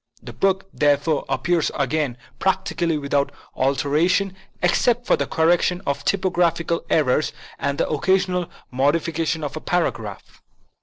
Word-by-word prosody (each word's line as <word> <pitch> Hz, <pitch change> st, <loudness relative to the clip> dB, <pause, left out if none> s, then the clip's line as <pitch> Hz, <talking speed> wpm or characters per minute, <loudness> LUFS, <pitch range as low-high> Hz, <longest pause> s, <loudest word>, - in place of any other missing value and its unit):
The -, -, -9 dB
book, 195 Hz, 0 st, +1 dB
therefore, 145 Hz, +1 st, +2 dB
appears 175 Hz, -2 st, +1 dB
again 140 Hz, -2 st, 0 dB, 0.2 s
practically 175 Hz, -3 st, 0 dB
without 140 Hz, -1 st, 0 dB, 0.2 s
alteration, 150 Hz, +8 st, +1 dB, 0.3 s
except 240 Hz, +7 st, +2 dB
for -, -, +4 dB
the -, -, -2 dB
correction 175 Hz, +2 st, +2 dB
of 140 Hz, 0 st, -2 dB
typographical 170 Hz, -3 st, +1 dB
errors 150 Hz, -1 st, +2 dB, 0.3 s
and 140 Hz, 0 st, -1 dB
the -, -, +1 dB
occasional 180 Hz, +3 st, +1 dB, 0.2 s
modification 160 Hz, +4 st, 0 dB
of 145 Hz, 0 st, -4 dB
a 155 Hz, -, -5 dB
paragraph. 115 Hz, -, -3 dB
160 Hz, 120 wpm, -22 LUFS, 140-180 Hz, 0.3 s, for